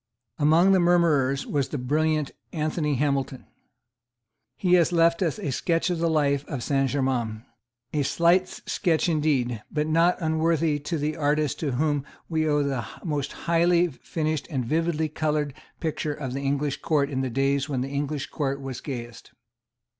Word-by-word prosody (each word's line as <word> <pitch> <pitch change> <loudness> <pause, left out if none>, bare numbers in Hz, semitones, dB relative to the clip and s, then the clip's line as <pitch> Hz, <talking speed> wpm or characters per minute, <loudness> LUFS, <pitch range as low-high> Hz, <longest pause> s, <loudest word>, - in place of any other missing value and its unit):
Among 160 +6 +5
the 190 - +5
murmurers 160 -6 +3
was 140 -3 -1
the 150 - -3
brilliant 150 +3 0 0.2
Anthony 155 -2 -1
Hamilton. 135 -1 -1 1.1
He 180 -2 +1
has 175 -1 +5
left 170 +1 +3
us 165 -5 0
a 175 -10 -3
sketch 165 +6 0
of 175 - -1
the 165 0 +1
life 140 -3 +2
of 135 -6 -4
Saint 135 -1 +1
Germains, 125 -5 -1 0.5
a 150 - +1
slight 170 +7 +3
sketch 175 -3 -1
indeed, 140 -8 +1
but 150 -1 -1
not 165 +3 +3
unworthy 160 -1 +1
of 150 +3 -3
the 150 +1 -1
artist 150 -1 0
to 145 -5 -1
whom 145 +1 0 0.2
we 160 -1 0
owe 145 -1 +2
the 135 -4 -1 0.2
most 145 -4 -2
highly 170 +1 +2
finished 155 +2 -3
and 130 -6 -2
vividly 160 +3 0
coloured 150 -2 -1 0.3
picture 155 -2 -2
of 135 -4 -5
the 135 - -3
English 140 0 -1
Court 145 -2 +1
in 130 -1 -1
the 130 - -1
days 135 +3 0
when 130 -3 -1
the 135 - -3
English 140 0 -3
Court 140 -3 -2
was 135 -2 -6
gayest. 120 -4 -7
150 Hz, 165 wpm, -25 LUFS, 140-160 Hz, 1.1 s, Among